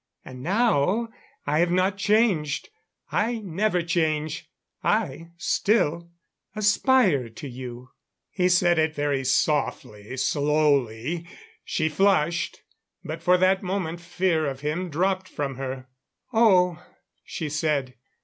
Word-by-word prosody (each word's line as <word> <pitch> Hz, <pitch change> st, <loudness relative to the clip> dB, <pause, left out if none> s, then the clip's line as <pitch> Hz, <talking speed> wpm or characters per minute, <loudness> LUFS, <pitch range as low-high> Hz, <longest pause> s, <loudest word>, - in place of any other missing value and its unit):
And 125 Hz, -1 st, -10 dB
now 210 Hz, -, +1 dB, 0.4 s
I 150 Hz, +2 st, +1 dB
have 175 Hz, +1 st, +3 dB
not 185 Hz, +2 st, +2 dB
changed. 195 Hz, -8 st, +1 dB, 0.4 s
I 230 Hz, +3 st, 0 dB
never 195 Hz, -2 st, -1 dB
change. 160 Hz, -3 st, -1 dB, 0.3 s
I 165 Hz, +5 st, 0 dB
still 170 Hz, -4 st, +1 dB, 0.5 s
aspire 210 Hz, -, +3 dB
to 115 Hz, +6 st, -9 dB
you." 125 Hz, -1 st, -9 dB, 0.4 s
He 180 Hz, -1 st, +1 dB
said 175 Hz, -1 st, +3 dB
it 155 Hz, 0 st, +1 dB
very 145 Hz, -2 st, 0 dB
softly, 130 Hz, -6 st, -1 dB
slowly. 145 Hz, +1 st, +1 dB, 0.4 s
She 155 Hz, -, -1 dB
flushed; 175 Hz, -1 st, +1 dB, 0.4 s
but -, -, -6 dB
for 180 Hz, 0 st, +4 dB
that 185 Hz, +1 st, +3 dB
moment 180 Hz, -3 st, -3 dB
fear 175 Hz, -3 st, 0 dB
of 135 Hz, -1 st, -5 dB
him 160 Hz, +5 st, -2 dB
dropped 185 Hz, +4 st, 0 dB
from 140 Hz, -3 st, -4 dB
her. 130 Hz, -1 st, -5 dB, 0.5 s
"Oh," 180 Hz, -6 st, +4 dB, 0.4 s
she 160 Hz, -, -5 dB
said. 150 Hz, -3 st, -1 dB
165 Hz, 115 wpm, -25 LUFS, 145-185 Hz, 0.5 s, for